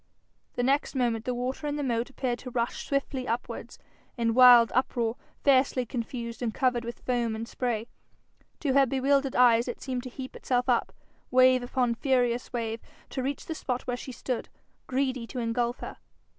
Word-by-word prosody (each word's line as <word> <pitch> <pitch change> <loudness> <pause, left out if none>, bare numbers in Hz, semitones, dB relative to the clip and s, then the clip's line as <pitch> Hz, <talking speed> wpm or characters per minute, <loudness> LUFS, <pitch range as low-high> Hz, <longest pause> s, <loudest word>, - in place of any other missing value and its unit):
The 245 - 0
next 275 +3 +1
moment 235 -3 0
the 250 - -1
water 255 +4 -3
in 290 - -1
the 295 - -2
moat 235 -2 -1
appeared 255 -3 -2
to 250 - -7
rush 235 -1 -2
swiftly 275 -2 -1
upwards, 235 +2 -4 0.4
in 230 -1 +1
wild 245 -1 +8
uproar, 240 -2 0 0.3
fiercely 260 -2 +3
confused, 235 0 -5
and 235 -2 0
covered 250 0 +1
with 235 0 -7
foam 240 -3 0
and 225 +1 -5
spray. 235 -3 -2 0.7
To 280 -4 +1
her 275 0 +5
bewildered 270 +1 +1
eyes, 240 -1 +5
it 245 - -4
seemed 255 -2 -3
to 255 - -7
heap 260 +1 -8
itself 250 0 0
up, 245 -2 +2 0.4
wave 255 0 +5
upon 245 -1 0
furious 245 -1 0
wave, 230 -1 -3 0.3
to 265 - -2
reach 275 +2 -3
the 320 - -3
spot 255 -5 -3
where 245 - -2
she 255 +1 -7
stood, 250 0 -4 0.4
greedy 260 -2 -1
to 255 - -8
engulf 235 +1 -1
her. - - -7
250 Hz, 180 wpm, -28 LUFS, 235-260 Hz, 0.7 s, wild